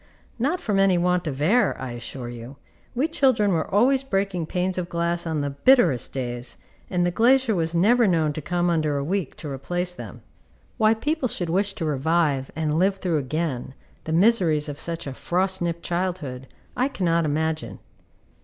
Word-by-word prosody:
Not 295 Hz, +10 st, 0 dB
from 205 Hz, -3 st, 0 dB
any 195 Hz, -2 st, +4 dB
want 180 Hz, 0 st, +1 dB
of 135 Hz, -3 st, -4 dB
air, 235 Hz, +10 st, +3 dB
I 130 Hz, -2 st, -5 dB
assure 120 Hz, +1 st, -7 dB
you, 120 Hz, +3 st, -9 dB, 0.4 s
we 270 Hz, +6 st, +1 dB
children 260 Hz, -10 st, +2 dB
were 160 Hz, -2 st, -1 dB
always 255 Hz, +7 st, +3 dB
breaking 195 Hz, -9 st, -2 dB
panes 185 Hz, +1 st, -1 dB
of 175 Hz, -1 st, -4 dB
glass 170 Hz, 0 st, -1 dB
on 160 Hz, -2 st, -1 dB
the 145 Hz, 0 st, -2 dB
bitterest 165 Hz, -, +3 dB
days, 120 Hz, -2 st, -4 dB, 0.3 s
and 175 Hz, -2 st, +1 dB
the 175 Hz, -, +1 dB
glazier 245 Hz, +4 st, +3 dB
was 165 Hz, -2 st, -1 dB
never 225 Hz, +7 st, +4 dB
known 160 Hz, -5 st, +2 dB
to 155 Hz, -, -5 dB
come 175 Hz, +3 st, 0 dB
under 155 Hz, -3 st, 0 dB
a 140 Hz, -, -1 dB
week 180 Hz, 0 st, -2 dB
to -, -, -8 dB
replace 175 Hz, +6 st, -2 dB
them. -, -, -10 dB, 0.5 s
Why 220 Hz, -1 st, +4 dB
people 295 Hz, +4 st, -1 dB
should 175 Hz, -5 st, -3 dB
wish 195 Hz, +2 st, 0 dB
to 165 Hz, -, -3 dB
revive, 150 Hz, -1 st, +1 dB
and 155 Hz, 0 st, 0 dB
live 190 Hz, +2 st, +3 dB
through 180 Hz, -5 st, -1 dB
again, 135 Hz, -2 st, -3 dB, 0.3 s
the 160 Hz, -, -4 dB
miseries 170 Hz, -5 st, +3 dB
of 145 Hz, -1 st, -6 dB
such 170 Hz, 0 st, -3 dB
a 135 Hz, -, -5 dB
frost 185 Hz, +6 st, 0 dB
nipped 170 Hz, -1 st, -2 dB
childhood, 170 Hz, -8 st, -3 dB, 0.3 s
I 255 Hz, -, +2 dB
cannot 170 Hz, -10 st, 0 dB
imagine. 155 Hz, +1 st, -2 dB
170 Hz, 180 wpm, -24 LUFS, 150-195 Hz, 0.5 s, any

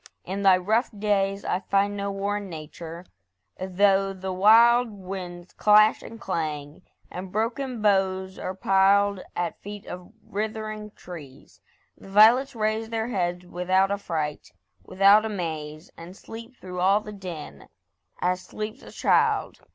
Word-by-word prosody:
in 195 Hz, +2 st, -4 dB
thy 190 Hz, -2 st, +6 dB
rough 220 Hz, +7 st, +1 dB
days 200 Hz, -1 st, 0 dB
I 180 Hz, -, 0 dB
find 200 Hz, 0 st, 0 dB
no 200 Hz, 0 st, -3 dB
war 200 Hz, +1 st, -2 dB
in 200 Hz, -2 st, -7 dB
Nature, 165 Hz, +2 st, -9 dB, 0.5 s
though 195 Hz, +1 st, +2 dB
the 190 Hz, 0 st, -5 dB
wild 230 Hz, +5 st, +6 dB
Winds 185 Hz, -3 st, -8 dB
clash 215 Hz, +1 st, +5 dB
and 230 Hz, -, -10 dB
clang, 155 Hz, -4 st, -4 dB, 0.3 s
and 185 Hz, 0 st, -7 dB
broken 230 Hz, +3 st, -2 dB
boughs 190 Hz, -2 st, +1 dB
are 185 Hz, -, -4 dB
piled 195 Hz, +1 st, +3 dB
At 175 Hz, -1 st, -3 dB
feet 205 Hz, 0 st, -8 dB
of 180 Hz, 0 st, -9 dB
writhing 215 Hz, 0 st, -4 dB
trees. 145 Hz, -7 st, -12 dB, 0.3 s
The -, -, -15 dB
violets 235 Hz, +7 st, +5 dB
raise 220 Hz, 0 st, -1 dB
Their 225 Hz, 0 st, -2 dB
heads 180 Hz, -4 st, -2 dB
without 185 Hz, +2 st, +1 dB
affright, 160 Hz, -7 st, -3 dB, 0.3 s
without 200 Hz, +3 st, +5 dB
amaze, 160 Hz, -7 st, -5 dB
And 175 Hz, +3 st, -11 dB
sleep 230 Hz, +3 st, -10 dB
through 180 Hz, -4 st, -8 dB
all 195 Hz, +3 st, +3 dB
the 210 Hz, 0 st, -9 dB
din, 180 Hz, -6 st, -9 dB, 0.5 s
as 180 Hz, +1 st, 0 dB
sleeps 215 Hz, +2 st, -7 dB
a -, -, -12 dB
child. -, -, +1 dB
195 Hz, 140 wpm, -25 LUFS, 180-215 Hz, 0.5 s, thy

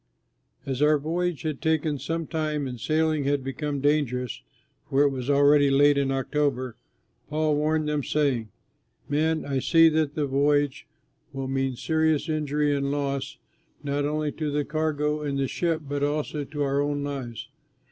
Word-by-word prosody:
As 135 Hz, 0 st, -3 dB
our 150 Hz, 0 st, +5 dB
voyage 170 Hz, +2 st, -2 dB
had 155 Hz, -3 st, -3 dB
taken 155 Hz, -3 st, 0 dB
some 165 Hz, +3 st, -3 dB
time 155 Hz, -2 st, -2 dB
and 125 Hz, -2 st, -6 dB
sailing 155 Hz, +1 st, +1 dB
had 140 Hz, -1 st, +1 dB
become 140 Hz, +1 st, -3 dB
dangerous 130 Hz, -5 st, 0 dB, 0.5 s
(for 140 Hz, +2 st, +3 dB
it 145 Hz, -, +3 dB
was 130 Hz, 0 st, -4 dB
already 145 Hz, 0 st, +5 dB
late 145 Hz, +1 st, +5 dB
in 140 Hz, -1 st, +1 dB
October) 135 Hz, -2 st, -1 dB, 0.5 s
Paul 155 Hz, 0 st, +1 dB
warned 155 Hz, +1 st, +1 dB
them, 150 Hz, -1 st, 0 dB
saying, 135 Hz, -8 st, 0 dB, 0.6 s
"Men, 155 Hz, +2 st, 0 dB
I 135 Hz, -2 st, -1 dB
see 165 Hz, +4 st, +5 dB
that 155 Hz, -2 st, 0 dB
the 150 Hz, -, 0 dB
voyage 145 Hz, +1 st, +1 dB, 0.5 s
will 135 Hz, -1 st, -4 dB
mean 135 Hz, -1 st, -1 dB
serious 160 Hz, +3 st, +1 dB
injury 150 Hz, -1 st, 0 dB
and 140 Hz, 0 st, -1 dB
loss, 140 Hz, -1 st, -2 dB, 0.5 s
not 145 Hz, 0 st, -1 dB
only 150 Hz, +1 st, -1 dB
to 155 Hz, 0 st, -3 dB
the 145 Hz, 0 st, 0 dB
cargo 150 Hz, -1 st, -1 dB
and 140 Hz, -2 st, -2 dB
the 135 Hz, -1 st, 0 dB
ship 165 Hz, +2 st, -1 dB
but 145 Hz, 0 st, -2 dB
also 145 Hz, 0 st, -1 dB
to 145 Hz, 0 st, -3 dB
our 140 Hz, 0 st, +1 dB
own 145 Hz, 0 st, -1 dB
lives." 130 Hz, -5 st, -5 dB
145 Hz, 165 wpm, -26 LUFS, 140-155 Hz, 0.6 s, our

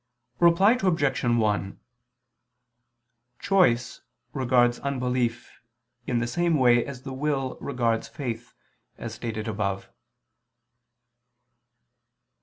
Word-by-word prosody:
Reply 175 Hz, +6 st, +5 dB
Obj. 165 Hz, -7 st, +1 dB
1: 105 Hz, -4 st, 0 dB, 1.6 s
Choice 155 Hz, -13 st, +2 dB, 0.3 s
regards 120 Hz, -2 st, +2 dB
unbelief 125 Hz, -3 st, -2 dB, 0.5 s
in 125 Hz, -, 0 dB
the 120 Hz, -, 0 dB
same 170 Hz, +6 st, +1 dB
way 120 Hz, -3 st, +4 dB
as 130 Hz, -2 st, -8 dB
the 135 Hz, -, -6 dB
will 135 Hz, -1 st, -2 dB
regards 120 Hz, -4 st, -1 dB
faith, 120 Hz, -4 st, -6 dB, 0.4 s
as -, -, -6 dB
stated 110 Hz, -1 st, -5 dB
above. 100 Hz, -2 st, -3 dB
125 Hz, 85 wpm, -26 LUFS, 115-140 Hz, 1.6 s, Reply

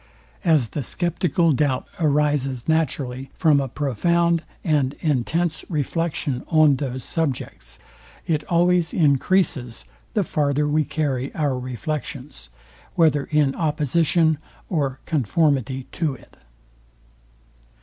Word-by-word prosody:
As 155 Hz, -, +3 dB
the 145 Hz, -, -3 dB
sceptical 175 Hz, +3 st, +1 dB
doubt 135 Hz, -2 st, 0 dB
arises 145 Hz, -5 st, +1 dB
naturally 135 Hz, -5 st, -1 dB
from 155 Hz, -4 st, +4 dB
a 135 Hz, -, -2 dB
profound 170 Hz, +6 st, +1 dB, 0.2 s
and 145 Hz, -5 st, +1 dB
intense 160 Hz, +3 st, 0 dB
reflection 150 Hz, -4 st, -2 dB
on 155 Hz, -4 st, +4 dB
those 130 Hz, -3 st, -4 dB
subjects, 135 Hz, -, -3 dB, 0.5 s
it 155 Hz, -2 st, 0 dB
always 175 Hz, 0 st, +2 dB
encreases, 140 Hz, -, +1 dB, 0.3 s
the 210 Hz, -, +3 dB
farther 150 Hz, -2 st, 0 dB
we 150 Hz, +1 st, +2 dB
carry 140 Hz, -3 st, -2 dB
our 145 Hz, -4 st, 0 dB
reflections, 130 Hz, -, -5 dB, 0.5 s
whether 150 Hz, -4 st, +3 dB
in 150 Hz, -3 st, +2 dB
opposition 160 Hz, +1 st, +1 dB, 0.3 s
or 140 Hz, -6 st, -1 dB
conformity 135 Hz, -2 st, +1 dB
to 155 Hz, -5 st, -1 dB
it. -, -, -18 dB
150 Hz, 105 wpm, -23 LUFS, 135-165 Hz, 0.5 s, from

